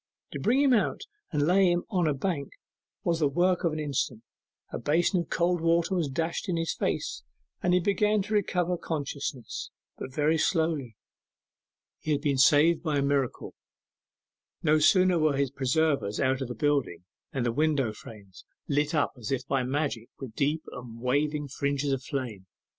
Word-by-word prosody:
To - - -5
bring 250 +5 +2
him 270 -2 +4
out 220 - +1 0.3
and 145 -3 +1
lay 185 +2 +4
him 175 0 0
on 180 -5 +2
a 150 - +1
bank 140 -2 -3 0.5
was 170 -1 +1
the 150 - +3
work 175 +6 +1
of 170 - +2
an 155 - -4
instant; 135 -6 -2 0.5
a - - -4
basin 175 +5 +2
of 170 - -4
cold 175 0 +1
water 165 +2 +2
was 170 -6 0
dashed 165 +7 -2
in 175 - 0
his 165 0 -1
face, - - -2 0.4
and 180 - +1
he - - +4
began 205 +2 +2
to 215 +2 -5
recover 180 -3 +1
consciousness, 140 -5 -4 0.3
but - - -6
very 155 +3 +1
slowly. 160 - 0 1.0
He 155 - -1
had 145 - -1
been 140 -3 0
saved 155 +4 +5
by 155 -3 0
a 140 - +1
miracle. 140 -3 -1 1.1
No 155 -1 +4
sooner 185 +2 +4
were 155 -3 +2
his 140 -2 0
preservers 135 -5 0
out 130 0 +1
of 135 - -2
the 125 - -6
building 130 - 0 0.3
than 135 - -2
the 120 - +1
window 140 -4 +1
frames 100 -4 -13 0.2
lit 145 +3 +1
up 150 - +1
as 110 0 -5
if 130 -2 -1
by 135 -1 +1
magic 130 -3 -2
with 130 -5 -8
deep 150 +6 0
and 120 -2 -9
waving 145 +4 0
fringes 140 +1 -1
of 135 -1 -1
flames. 125 -10 -5
150 Hz, 180 wpm, -28 LUFS, 135-170 Hz, 1.1 s, saved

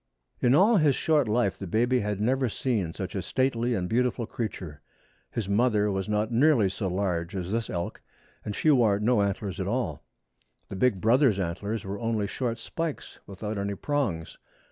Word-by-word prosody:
In 125 +2 +4
all 210 +7 +5
his 150 -6 +4
short 150 -5 +2
life 105 -3 +1
the 100 - -5
baby 120 +7 +2
had 105 -2 -2
never 130 +3 +1
seen 105 -7 -1
such 95 +1 -5
a 95 - -2
stately 120 +3 0
and 90 -3 -2
beautiful 120 +2 0
creature. 95 -10 -5 0.5
His 110 -4 -3
mother 105 0 +2
was 95 +1 -2
not 105 +2 0
nearly 120 -4 +4
so 95 +1 -3
large 90 -1 -2
as 90 0 -4
this 115 0 -1
elk, 85 -1 -4 0.4
and 105 - -4
she 155 - +3
wore 110 -7 +4
no 110 +1 +3
antlers 100 -1 -2
at 95 - -2
all. 115 - -2 0.7
The - - -6
big 95 -2 +1
brother's 120 -1 +4
antlers 100 +5 -3
were 100 +1 -4
only 115 -3 0
short 115 +3 -2
spikes 160 +6 -5
without 105 +2 -5
any 100 0 -2
prongs. 115 - -2
105 Hz, 180 wpm, -27 LUFS, 95-125 Hz, 0.7 s, all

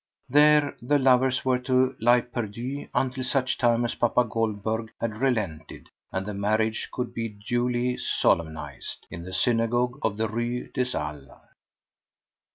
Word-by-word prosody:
There 150 +2 +5
the 145 +5 +2
lovers 130 -1 +3
were 130 -1 +2
to 130 +1 +2
lie 120 +2 +5
perdu 120 +3 -5
until 130 0 -1
such 130 0 0
time 120 -1 +3
as 120 - -1
papa 120 +1 +2
Goldberg 110 -1 -2
had 110 -2 -3
relented 105 - -2 0.2
and 95 0 -2
the 105 - -4
marriage 110 +2 0
could 125 -1 -4
be 115 -1 -3
duly 120 +4 -1
solemnized 80 -4 -1
in 85 - -6
the 90 +2 -8
synagogue 120 +5 +1
of 105 -5 -1
the 110 0 0
Rue 120 +3 -3
des 125 0 -1
Halles. 75 -3 -5
120 Hz, 145 wpm, -26 LUFS, 105-125 Hz, 0.2 s, There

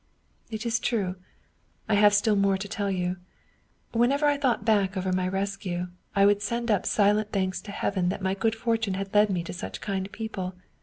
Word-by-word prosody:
" - - -41
" - - -41
It 220 0 -5
is 235 0 +1
true, 200 -6 -1 0.7
I 215 - +1
have 205 0 +6
still 210 +1 +3
more 200 -1 +3
to 200 +2 -5
tell 200 0 -2
you. 180 -1 -1 0.7
Whenever 255 +6 +2
I 290 0 +4
thought 255 -7 0
back 200 -3 +2
over 185 0 -1
my 185 0 +1
rescue, 190 -2 -3 0.3
I 200 0 +5
would 205 0 +4
send 235 +2 -1
up 200 -3 +1
silent 210 +1 +2
thanks 190 -2 -1
to 210 - -9
Heaven 185 -3 0
that 185 - -2
my 190 0 +1
good 220 +3 0
fortune 225 -3 0
had 195 0 -5
led 210 0 +5
me 180 -3 -1
to - - -6
such 180 - -6
kind 195 -1 -3
people. 190 -5 -5
200 Hz, 210 wpm, -27 LUFS, 190-220 Hz, 0.7 s, have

